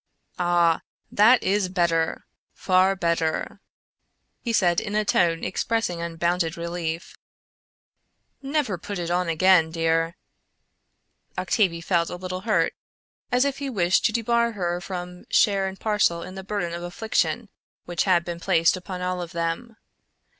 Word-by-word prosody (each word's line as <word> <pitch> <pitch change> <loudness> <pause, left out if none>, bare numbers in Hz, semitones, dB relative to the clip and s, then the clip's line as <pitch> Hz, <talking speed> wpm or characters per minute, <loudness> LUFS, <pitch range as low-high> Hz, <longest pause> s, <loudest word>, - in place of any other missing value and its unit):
"Ah! 175 -2 +3 0.3
that 225 +4 +5
is 195 -1 +1
better; 170 -3 0 0.3
far 185 +1 +3
better!" 170 -3 -1 0.8
he 235 - -2
said 175 -6 +3
in 210 0 -4
a 215 0 +1
tone 165 -4 +2
expressing 185 -2 -1
unbounded 170 0 -1
relief. 170 0 -4 1.3
"Never 270 - -1
put 200 +3 -6
it 175 -1 -3
on 180 0 0
again, 165 0 +4
dear." 165 0 0 1.2
Octavie 175 -6 +1
felt 170 -1 +1
a - - -5
little 185 +1 -5
hurt; 215 +2 +1 0.6
as 250 +2 +3
if 280 -1 -2
he 280 -1 -3
wished 185 -7 +2
to - - +4
debar 235 +1 +1
her 175 -3 -2
from 180 -1 -7
share 195 -2 +3
and 190 0 -7
parcel 210 -6 +1
in 185 - -8
the 190 0 -7
burden 195 -4 -3
of 170 - -5
affliction 175 +6 -1 0.4
which 175 -1 -1
had 175 -3 +3
been 170 -1 -5
placed 170 -2 +3
upon 185 0 -6
all 180 0 -2
of 175 +1 -7
them. 170 +8 -3
180 Hz, 145 wpm, -24 LUFS, 170-205 Hz, 1.3 s, that